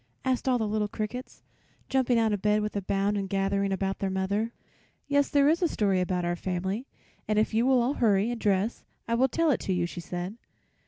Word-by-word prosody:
asked 260 0 +1
all 250 - +3
the 220 -2 -1
little 210 0 0
crickets, 220 +5 -6 0.4
jumping 260 -2 +2
out 225 -2 +2
of 205 - -2
bed 210 0 +2
with 210 - -4
a 200 - 0
bound 195 +2 0
and 195 -1 -2
gathering 195 0 0
about 195 0 -1
their 195 - -1
mother. 200 +4 -1 0.6
"Yes, 285 0 +2
there 285 -1 +4
is 325 +4 +3
a 350 - +4
story 195 - +1
about 180 -1 -1
our 175 0 0
family, 190 +7 -3 0.4
and 215 0 +1
if 215 +1 +2
you 230 +3 +2
will 260 -1 +5
all 255 +4 +1
hurry 215 -3 +2
and 240 - -5
dress 205 +2 0 0.2
I 230 - -1
will 255 +3 +4
tell 330 +3 +2
it 255 - +1
to 190 - -2
you," 175 -1 +1
she 175 - -6
said. 180 +5 -5
210 Hz, 225 wpm, -28 LUFS, 195-240 Hz, 0.6 s, will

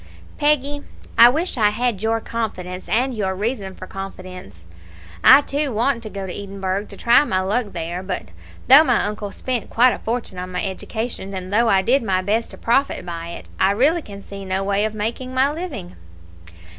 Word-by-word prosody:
"Peggy, 290 -1 +1 0.3
I 235 - +9
wish 310 +1 -2
I 210 -1 +5
had 225 -1 -1
your 225 +1 +1
confidence 185 -6 -5
and 255 +4 +1
your 195 -4 -1
reason 200 -2 -3
for - - -9
confidence. 185 - -9 0.6
I, 270 +2 +9
too, 285 0 -2
want 235 +2 +1
to 220 - -7
go 195 -2 -6
to 180 - -6
Edinburgh 195 0 -3
to - - -13
try 240 +4 +5
my 185 -9 0
luck 210 +5 0
there; 175 -1 -5
but 185 - -5 0.4
though 275 +4 +9
my 250 -7 +2
uncle 210 -1 -4
spent 250 0 -3
quite 245 +2 +4
a - - -6
fortune 225 -5 -4
on 185 0 -6
my 180 +2 -2
education, 200 +1 -4
and 185 +1 -6
though 230 +2 +4
I 190 -2 +4
did 265 +6 +3
my 185 -4 0
best 215 +4 0
to - - -9
profit 270 0 +1
by 170 -1 -5
it, 170 - -8
I 190 +1 +4
really 295 +10 +3
can 200 -6 -10
see 200 -1 -8
no 190 0 -1
way 200 +1 +1
of 215 0 -3
making 235 +5 -4
my 265 +2 +3
living." 305 - -6
210 Hz, 195 wpm, -21 LUFS, 190-250 Hz, 0.6 s, I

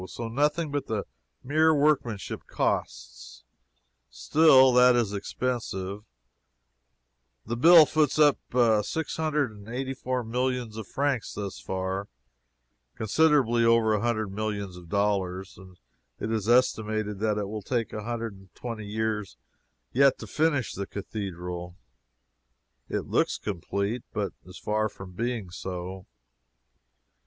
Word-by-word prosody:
So 115 - -6
nothing 150 +5 0
but 145 -1 -2
the 110 -2 -2 0.4
mere 155 +3 +3
workmanship 140 -8 0
costs; - - -3 0.7
still 135 -5 +5
that 125 0 +6
is 115 -4 +1
expensive 105 -2 -3 1.4
the 115 - -3
bill 165 +5 +8
foots 150 -1 +1
up 150 -2 +5 0.4
six 160 +9 -3
hundred 150 -5 0
and 105 0 -13
eighty 130 +2 -3
four 130 -1 -2
millions 125 -1 -2
of 110 -3 -6
francs 140 -5 -1
thus 100 -2 -5
far 95 +1 -3 0.9
(considerably 120 -1 +3
over 115 -1 +4
a 105 - 0
hundred 110 -4 -1
millions 100 -2 -3
of 90 -2 -12
dollars,) 95 -1 -1
and 95 -1 -14 0.4
it 110 - -3
is 110 -1 -1
estimated 110 -4 +2
that 105 -1 0
it 105 -1 -2
will 105 +1 -5
take 115 +2 -2
a 105 - -4
hundred 115 0 -4
and 95 -2 -18
twenty 115 -4 -6
years 110 -2 -2 0.6
yet 135 +1 +5
to - - -8
finish 150 -5 0
the 100 0 -5
cathedral. 90 -4 -6 1.1
It - - -2
looks - - +1
complete, 100 +4 -3
but 105 -2 -2
is 90 - -11
far 110 0 0
from 95 -2 -11
being 115 -1 -3
so. 90 +1 -6
110 Hz, 130 wpm, -27 LUFS, 100-125 Hz, 1.4 s, bill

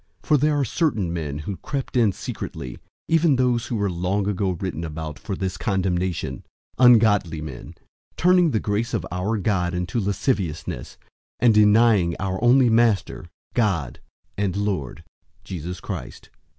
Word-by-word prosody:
001:004 - - -22
For 150 - +6
there 150 +1 +2
are 140 - +1
certain 110 - 0
men 75 -4 -3
who 90 +5 -5
crept 135 -3 -5
in 115 -5 +4
secretly, 65 -7 -7 0.3
even 165 -3 +3
those 125 -2 +1
who 120 - -3
were 100 -2 0
long 95 +3 -1
ago 100 -1 0
written 90 -2 -4
about 80 -1 -6
for 100 - -4
this 95 -2 -3
condemnation: 95 -3 -1 0.4
ungodly 110 -9 +5
men, 75 -5 -8 0.4
turning 180 -1 +4
the 110 - 0
grace 110 +4 -1
of 110 - -2
our 95 +5 -1
God 90 -4 0
into 90 +6 -2
lasciviousness, 95 - -2 0.4
and 120 -2 +5
denying 105 -4 +4
our 95 +2 -3
only 125 +1 +5
Master, 110 -6 +1 0.2
God, 95 - 0 0.4
and 100 -3 0
Lord, 100 -10 -3 0.4
Jesus 90 0 -6
Christ. 85 - -7
100 Hz, 150 wpm, -23 LUFS, 90-115 Hz, 0.4 s, For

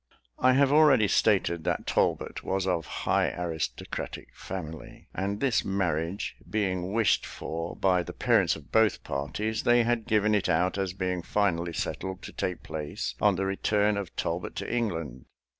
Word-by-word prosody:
I 130 0 +5
have 140 +1 +4
already 145 -8 +6
stated 90 -6 +2
that - - -1
Talbot - - 0
was 95 0 -1
of 85 -5 -1 0.2
high - - +3
aristocratic 85 -3 -4
family; 80 -4 -8
and 100 +2 -2
this 130 -2 +2
marriage 90 -2 -1
being 95 -3 -1
wished 110 -3 +3
for 80 +1 -5
by 90 -2 +2
the - - -6
parents - - +2
of - - -13
both 110 -2 +3
parties, 105 +11 -2
they 120 0 +4
had 115 -1 0
given 110 -2 +3
it 105 -3 +1
out 90 +3 +1
as 95 -2 -1
being 90 -2 -2
finally 85 -3 0
settled 95 +2 -4
to - - -8
take 90 -2 -3
place 75 -1 -4
on 105 -2 +4
the 95 +2 -1
return 105 +2 +1
of 100 -5 -5
Talbot 85 +2 -3
to - - -4
England. 80 - -3
95 Hz, 160 wpm, -28 LUFS, 85-105 Hz, 0.2 s, already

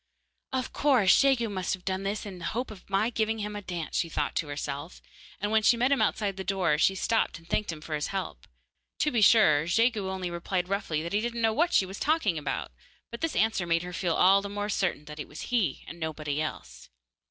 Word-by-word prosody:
'Of 260 -2 -2
course, 255 -10 +4
Jegu 265 -4 +3
must 190 -2 -2
have 185 - -20
done 190 0 -1
this 200 +2 -3
in 190 -3 -8
the - - -6
hope 250 -2 -2
of 200 -2 -13
my 195 +4 +1
giving 220 -1 0
him 210 -1 -4
a 205 - -4
dance,' 175 -4 -5
she 170 - 0
thought 150 -2 -2
to 155 - -1
herself, 145 +2 -5 0.4
and 205 +1 -2
when 220 0 +4
she 235 +2 +4
met 250 +3 +2
him 280 - +3
outside 200 -3 0
the 190 - -4
door 185 -5 +1
she 190 - +3
stopped 225 +1 0
and 165 0 -18
thanked 210 +2 -1
him 155 -2 -8
for 155 - -6
his 150 -1 -1
help. 185 - -5 0.5
To 300 - +1
be 235 - +1
sure, 160 -9 +5
Jegu 220 0 +2
only 185 -2 -3
replied 180 +1 -2
roughly 195 -6 -1
that 170 - -5
he 205 - +2
didn't 235 0 -3
know 225 -1 +3
what 340 +8 +2
she 195 - +4
was 190 +2 -8
talking 270 - +1
about, 145 -2 -3 0.4
but 235 - -7
this 330 - -1
answer 220 -5 +1
made 165 0 +1
her 180 0 -7
feel 175 -2 0
all 195 +2 +5
the 200 - -6
more 205 +1 -3
certain 190 -7 -1
that 150 0 -9
it 150 - -5
was 150 - -8
he 195 - +1
and 170 - -9
nobody 155 -2 -3
else. 60 - -6
195 Hz, 240 wpm, -28 LUFS, 165-220 Hz, 0.5 s, sure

